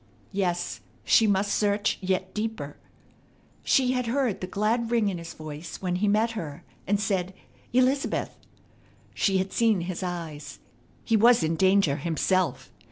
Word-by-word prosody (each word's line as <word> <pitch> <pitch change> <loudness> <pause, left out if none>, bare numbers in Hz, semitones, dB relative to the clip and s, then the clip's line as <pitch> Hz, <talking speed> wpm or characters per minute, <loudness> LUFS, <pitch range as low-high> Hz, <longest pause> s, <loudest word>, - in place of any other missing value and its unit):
Yes, 180 -3 -1 0.2
she 225 - +5
must 200 0 +1
search 205 0 +1
yet 185 0 -1
deeper. 210 -10 -4 0.9
She 255 -2 +3
had 250 -2 -1
heard 245 -3 0
the 185 - -3
glad 220 +5 0
ring 230 -3 +2
in 180 -3 -4
his 170 0 -9
voice 155 +1 -8
when 180 -1 -1
he 210 +3 +1
met 215 +3 +2
her, 160 -10 -6 0.2
and 205 +1 +2
said, 190 -3 -1 0.4
"Elizabeth!" 255 +3 +1 0.8
She 195 -2 +1
had 190 +1 -2
seen 225 -5 +3
his 175 +1 -4
eyes. 165 -5 -5 0.5
He 225 - +1
was 230 -2 +5
in 160 +1 +1
danger 190 -5 +3
himself. 170 -1 0
195 Hz, 150 wpm, -26 LUFS, 175-220 Hz, 0.9 s, she